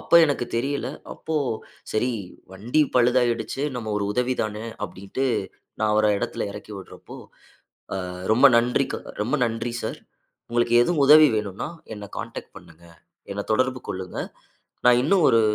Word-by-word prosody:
அப்ப 170 Hz, -, +6 dB
எனக்கு 145 Hz, -5 st, 0 dB
தெரியல. 135 Hz, +5 st, -1 dB, 0.3 s
அப்போ 160 Hz, -, -6 dB, 0.6 s
சரி 110 Hz, +4 st, +1 dB, 0.4 s
வண்டி 115 Hz, +10 st, 0 dB
பழுதாகிடுச்சு, 125 Hz, 0 st, +2 dB
நம்ம 115 Hz, -3 st, -4 dB
ஒரு 100 Hz, -, -1 dB
உதவி 125 Hz, +3 st, +1 dB
தான 105 Hz, -1 st, -2 dB, 0.3 s
அப்படின்னுட்டு 95 Hz, +8 st, -4 dB, 0.5 s
நான் 110 Hz, -1 st, +2 dB
அவர 110 Hz, 0 st, +4 dB
இடத்துல -, -, -3 dB
இறக்கி 105 Hz, -, -9 dB
விட்றப்போ, 95 Hz, -, -11 dB, 0.8 s
அ -, -, -1 dB, 0.3 s
ரொம்ப 125 Hz, +5 st, +7 dB
நன்றி 120 Hz, +1 st, +2 dB
க -, -, 0 dB, 0.3 s
ரொம்ப 120 Hz, +7 st, 0 dB
நன்றி 115 Hz, +1 st, -3 dB
சார். -, -, -4 dB, 0.5 s
உங்களுக்கு 120 Hz, 0 st, +2 dB
எதுவும் 160 Hz, +1 st, +1 dB
உதவி 155 Hz, +2 st, +9 dB
வேணும்னா, 105 Hz, +3 st, -3 dB, 0.3 s
என்ன 100 Hz, -2 st, -9 dB
கான்டாக்ட் -, -, -7 dB
பண்ணுங்க. 80 Hz, +1 st, -16 dB, 0.5 s
என்ன 100 Hz, +1 st, -3 dB
தொடர்பு 130 Hz, +2 st, +1 dB
கொள்ளுங்க. 95 Hz, -1 st, -5 dB, 0.7 s
நான் 125 Hz, 0 st, +6 dB
இன்னும் 175 Hz, +3 st, +4 dB
ஒரு 115 Hz, -, +5 dB
120 Hz, 145 wpm, -24 LUFS, 105-130 Hz, 0.8 s, உதவி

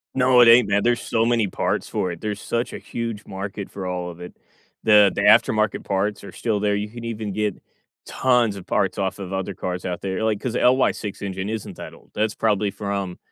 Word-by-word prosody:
No, 125 Hz, -1 st, +5 dB
it 120 Hz, -, +7 dB
ain't, 115 Hz, -2 st, +7 dB
man. 100 Hz, 0 st, +2 dB
There's 120 Hz, 0 st, +2 dB
so 115 Hz, 0 st, 0 dB
many 115 Hz, -3 st, +2 dB
parts -, -, -2 dB
for 90 Hz, -, -1 dB
it. 85 Hz, -, -8 dB
There's 105 Hz, -1 st, -3 dB
such 120 Hz, +1 st, -2 dB
a -, -, -4 dB
huge 115 Hz, -3 st, -5 dB
market 95 Hz, +1 st, -6 dB
for 95 Hz, -2 st, -5 dB
all 90 Hz, -1 st, -3 dB
of 85 Hz, +1 st, -13 dB
it. 90 Hz, -, -9 dB, 0.5 s
The 105 Hz, -2 st, +6 dB
the -, -, -2 dB
aftermarket 110 Hz, 0 st, +4 dB
parts 100 Hz, +1 st, -1 dB
are -, -, -9 dB
still 110 Hz, -3 st, -1 dB
there. 105 Hz, 0 st, +1 dB
You 105 Hz, +1 st, -3 dB
can 115 Hz, +1 st, -9 dB
even 110 Hz, -3 st, -4 dB
get 105 Hz, -2 st, -1 dB, 0.5 s
tons 120 Hz, -5 st, +2 dB
of 95 Hz, -3 st, -10 dB
parts 95 Hz, -2 st, 0 dB
off 95 Hz, 0 st, -1 dB
of 95 Hz, -1 st, -6 dB
other 95 Hz, +1 st, -3 dB
cars 90 Hz, 0 st, -4 dB
out 90 Hz, -1 st, -3 dB
there. 95 Hz, +2 st, -3 dB
Like, 110 Hz, -2 st, +1 dB
'cause 125 Hz, -2 st, -3 dB
the -, -, 0 dB
LY6 125 Hz, -6 st, +2 dB
engine 95 Hz, 0 st, -4 dB
isn't 110 Hz, -1 st, -5 dB
that -, -, -8 dB
old. -, -, -19 dB
That's 110 Hz, 0 st, -1 dB
probably 105 Hz, -2 st, +1 dB
from, 100 Hz, -2 st, -4 dB
105 Hz, 225 wpm, -23 LUFS, 95-115 Hz, 0.5 s, it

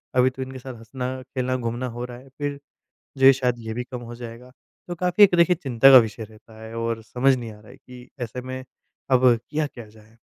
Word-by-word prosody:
अभी 130 Hz, 0 st, +5 dB
तो 130 Hz, +1 st, -9 dB
इनके 130 Hz, 0 st, -6 dB
साथ 130 Hz, 0 st, -8 dB
हँसना, 125 Hz, +3 st, -5 dB
खेलना, 130 Hz, 0 st, -2 dB
घूमना 120 Hz, +1 st, -3 dB
हो 120 Hz, -, -3 dB
रहा 120 Hz, -1 st, -9 dB
है, 135 Hz, +2 st, -16 dB
फिर 145 Hz, -1 st, -3 dB, 0.6 s
जो 135 Hz, -, +5 dB
है, 135 Hz, -, +10 dB
शायद 125 Hz, -2 st, -1 dB
ये 110 Hz, -1 st, -6 dB
भी 125 Hz, +1 st, -3 dB
कम 125 Hz, -1 st, -7 dB
हो -, -, -7 dB
जाएगा।" 120 Hz, +1 st, -10 dB, 0.4 s
तो 175 Hz, -, -3 dB
काफ़ी 180 Hz, +4 st, +5 dB
एक, 185 Hz, -, +3 dB
देखिए, 170 Hz, +1 st, +4 dB
चिंता 135 Hz, -4 st, +4 dB
का 130 Hz, -, +11 dB
विषय 110 Hz, -1 st, -1 dB
रहता 110 Hz, +1 st, -16 dB
है 110 Hz, +1 st, -9 dB
और 115 Hz, 0 st, -2 dB
समझ 125 Hz, +4 st, +2 dB
नहीं 115 Hz, -3 st, -7 dB
आ 105 Hz, -, -14 dB
रहा 110 Hz, -, -17 dB
है 130 Hz, -, -14 dB
कि 125 Hz, -2 st, -14 dB
ऐसे 120 Hz, +1 st, -5 dB
में 130 Hz, +1 st, -7 dB, 0.5 s
अब 130 Hz, 0 st, +4 dB, 0.2 s
किया 155 Hz, 0 st, 0 dB
क्या 120 Hz, -5 st, -11 dB
जाए? 110 Hz, +1 st, -20 dB
125 Hz, 240 wpm, -23 LUFS, 115-130 Hz, 0.6 s, का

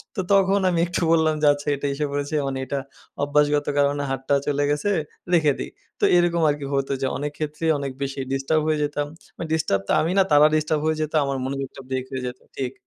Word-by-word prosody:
তো 195 Hz, -, 0 dB
তখন 195 Hz, 0 st, +4 dB
আমি 175 Hz, -2 st, +1 dB
একটু 175 Hz, -, -2 dB
বললাম 160 Hz, -1 st, +3 dB
যে, 150 Hz, -, +4 dB
"আচ্ছা 145 Hz, +1 st, -9 dB
এটা 140 Hz, +1 st, -3 dB
এসে 150 Hz, +2 st, -1 dB
পড়েছে 145 Hz, +2 st, -2 dB
মানে 135 Hz, -1 st, -3 dB
এটা 140 Hz, +2 st, -2 dB, 0.4 s
অভ্যাসগত 145 Hz, 0 st, +2 dB
কারণে 145 Hz, 0 st, +2 dB
হাতটা 135 Hz, +1 st, 0 dB
চলে 145 Hz, 0 st, +1 dB
গেছে, 150 Hz, +8 st, 0 dB, 0.4 s
রেখে 155 Hz, -4 st, +4 dB
দিই।" -, -, -5 dB, 0.3 s
তো -, -, -5 dB
এরকম 175 Hz, -1 st, +2 dB
আর 145 Hz, -, +1 dB
কি 140 Hz, -, -5 dB
হতো 135 Hz, 0 st, 0 dB
যে 135 Hz, -, +1 dB
অনেক 145 Hz, +1 st, -3 dB
ক্ষেত্রেই 155 Hz, +1 st, -1 dB
অনেক 140 Hz, -1 st, -3 dB
বেশি 140 Hz, 0 st, -3 dB
ডিস্টার্ব 135 Hz, +4 st, +1 dB
হয়ে 155 Hz, -1 st, +1 dB
যেতাম। 145 Hz, 0 st, -2 dB, 0.3 s
মানে 165 Hz, -, -5 dB
ডিস্টার্ব 155 Hz, -12 st, +1 dB
তো -, -, -1 dB
আমি 165 Hz, -, 0 dB
না 195 Hz, -, +6 dB
তারা 145 Hz, 0 st, +7 dB
ডিস্টার্ব 155 Hz, 0 st, 0 dB
হয়ে 160 Hz, 0 st, +1 dB
যেত, 155 Hz, 0 st, -3 dB
আমার 140 Hz, -1 st, -2 dB
মনোযোগটা 135 Hz, 0 st, -5 dB
ব্রেক 130 Hz, -1 st, -2 dB
হয়ে 130 Hz, -1 st, -4 dB
যেত। 125 Hz, +1 st, -7 dB, 0.2 s
ঠিক। 130 Hz, -1 st, -2 dB
145 Hz, 220 wpm, -23 LUFS, 140-155 Hz, 0.4 s, তারা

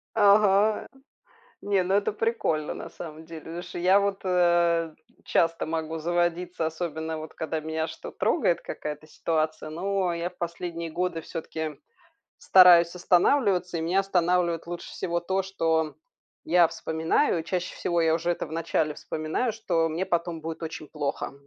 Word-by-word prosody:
Ага. 205 Hz, 0 st, +4 dB, 0.7 s
Не, 200 Hz, -2 st, +1 dB
ну 185 Hz, +2 st, -1 dB
это 200 Hz, 0 st, +2 dB
прикольно, 210 Hz, -9 st, -1 dB
на -, -, -8 dB
самом 160 Hz, -1 st, -9 dB
деле. 165 Hz, -1 st, -9 dB
Потому 165 Hz, +2 st, -6 dB
что -, -, -8 dB
я 185 Hz, +3 st, +5 dB
вот, 200 Hz, -1 st, -1 dB
э, 170 Hz, -2 st, +2 dB, 0.3 s
часто 165 Hz, 0 st, +1 dB
могу 160 Hz, 0 st, -3 dB
заводиться, 175 Hz, +1 st, -1 dB
особенно 160 Hz, 0 st, -3 dB
вот 155 Hz, 0 st, -9 dB
когда 160 Hz, 0 st, -3 dB
меня 160 Hz, +1 st, -2 dB
что -, -, -8 dB
трогает, -, -, +1 dB
какая-то 150 Hz, +1 st, -6 dB
ситуация. 155 Hz, -1 st, -2 dB
Но 185 Hz, +2 st, -1 dB
я 170 Hz, +1 st, -2 dB
в 180 Hz, -, -24 dB
последние 170 Hz, -1 st, -4 dB
годы 175 Hz, 0 st, -2 dB
всё-таки 160 Hz, -2 st, -5 dB, 0.6 s
стараюсь 175 Hz, -2 st, +7 dB
останавливаться. 180 Hz, 0 st, +2 dB
И -, -, -2 dB
меня 175 Hz, +4 st, +1 dB
останавливает 180 Hz, -3 st, +1 dB
лучше 175 Hz, 0 st, -6 dB
всего 170 Hz, -2 st, -2 dB
то, 190 Hz, +3 st, -1 dB
что 160 Hz, -4 st, 0 dB, 0.5 s
я 175 Hz, -1 st, +5 dB
вспоминаю. 160 Hz, -, 0 dB
Чаще 180 Hz, +2 st, -3 dB
всего 170 Hz, -1 st, 0 dB
я 160 Hz, -1 st, +3 dB
уже 170 Hz, +1 st, 0 dB
это 170 Hz, -, -3 dB
вначале 160 Hz, -1 st, -1 dB
вспоминаю, 155 Hz, +10 st, -2 dB
что 180 Hz, -7 st, 0 dB
мне 165 Hz, +4 st, -2 dB
потом 170 Hz, -2 st, -1 dB
будет 165 Hz, +1 st, -6 dB
очень 160 Hz, -1 st, -6 dB
плохо. 145 Hz, -3 st, -3 dB
170 Hz, 150 wpm, -26 LUFS, 160-180 Hz, 0.7 s, стараюсь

